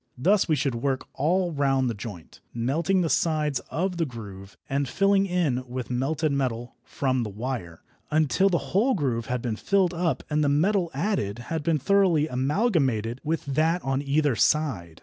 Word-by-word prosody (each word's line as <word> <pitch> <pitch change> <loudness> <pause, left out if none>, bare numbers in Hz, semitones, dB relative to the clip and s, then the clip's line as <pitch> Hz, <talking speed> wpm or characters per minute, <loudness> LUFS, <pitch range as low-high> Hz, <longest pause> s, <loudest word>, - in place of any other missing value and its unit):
Thus 190 +10 +3
we 155 - +4
should 140 -2 0
work 130 +3 -2
all 175 +5 +1
round 135 -3 +1
the 120 - -1
joint, 100 -5 -9
melting 155 +11 +1
the 170 - +1
sides 150 -5 +1
of 180 +2 -2
the 165 - +1
groove 100 -5 -10
and 140 0 -1
filling 195 +3 +2
in 160 -9 0
with 125 0 -5
melted 145 +5 0
metal 125 -3 -2
from 130 -2 -1
the 110 - -3
wire, 105 -6 -5 0.3
until 155 +5 +3
the 175 - -2
whole 235 +8 +3
groove 125 - -1
had 125 -1 -2
been 115 -3 -1
filled 190 - +1
up 170 -1 -1
and 150 0 +1
the 145 - +2
metal 175 +5 +2
added 115 - -1 0.2
had 160 - -1
been 160 +1 +1
thoroughly 170 -1 +3
amalgamated 130 - 0
with 160 +1 -2
that 160 +5 +1
on 135 0 0
either 145 -1 +1
side. 110 - 0
145 Hz, 175 wpm, -26 LUFS, 125-170 Hz, 0.3 s, we